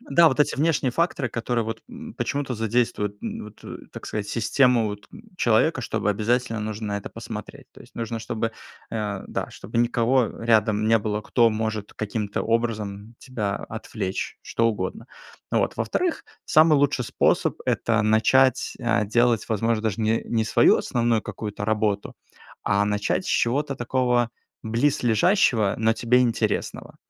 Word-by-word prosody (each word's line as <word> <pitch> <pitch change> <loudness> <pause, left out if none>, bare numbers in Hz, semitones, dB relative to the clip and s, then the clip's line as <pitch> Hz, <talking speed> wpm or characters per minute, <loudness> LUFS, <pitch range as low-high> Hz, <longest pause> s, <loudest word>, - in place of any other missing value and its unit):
Да, 170 - +5
вот 130 - -2
эти 150 - +3
внешние 145 -4 +1
факторы, 165 -4 0
которые, 115 0 -1
вот, 115 +1 -5
эм, 240 -2 -10
почему-то 140 -3 -2
задействуют, 110 -2 0
м, - - -5
вот, 105 0 -11
так - - -9
сказать, 105 -1 -4
систему, 120 0 +2
вот 105 0 -7 0.3
человека, - - +2
чтобы 105 - -2
обязательно 115 +2 0
нужно 110 0 -4
на 100 0 -1
это - - -9
посмотреть. - - -8
То - - -17
есть - - -16
нужно, 115 0 -4
чтобы, 115 0 -3 0.4
э, 105 -3 -3
да, - - -4
чтобы - - -5
никого 120 +1 +2
рядом 110 -2 +2
не 115 0 +5
было, 105 0 -2
кто 115 +1 +3
может 110 -1 -3
каким-то 105 -1 -3
образом 110 -2 -2
тебя 105 -7 -3
отвлечь, 95 0 -5
что 115 0 +1
угодно. 105 +2 -4 0.4
Вот. - - 0
Во-вторых, 360 -2 -1 0.2
самый 155 0 +5
лучший 140 -3 +1
способ- - - +1
это 115 -1 +1
начать, 110 +5 +3
а, 105 - +1
делать, 120 +1 +2
возможно, 115 0 0
даже 110 -1 -1
не 110 +1 +2
не 110 -2 +1
свою - - +5
основную 115 -2 0
какую-то 105 0 -5
работу, 105 -2 0 0.5
а 100 +1 +2
начать 105 0 0
с - - -4
чего-то 140 +4 +1
такого 120 -1 +1 0.3
близлежащего, 115 - +2
но 110 0 +3
тебе 120 +2 +2
интересного. 115 -3 -1
115 Hz, 150 wpm, -24 LUFS, 105-125 Hz, 0.5 s, Да